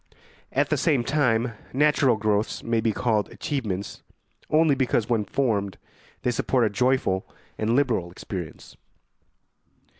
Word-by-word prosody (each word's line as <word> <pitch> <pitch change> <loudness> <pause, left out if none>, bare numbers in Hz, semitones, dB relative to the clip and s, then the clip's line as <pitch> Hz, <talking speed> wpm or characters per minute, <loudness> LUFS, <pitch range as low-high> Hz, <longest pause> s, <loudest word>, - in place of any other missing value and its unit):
At - - +1
the - - +3
same 145 -8 +2
time, 125 -4 +1 0.2
natural 140 -3 +3
growths 105 0 -1
may 115 -1 0
be 110 - +1
called 110 -2 0
achievements 105 -9 -4 0.5
only 155 -1 +4
because, 125 -4 +1
when 115 -4 +1
formed, 105 -8 -1 0.5
they 125 - +2
support 120 0 +1
a 105 - 0
joyful 125 -4 +1 0.3
and 110 +2 0
liberal 120 -11 +1
experience. 85 -2 -8
115 Hz, 125 wpm, -25 LUFS, 105-130 Hz, 0.5 s, only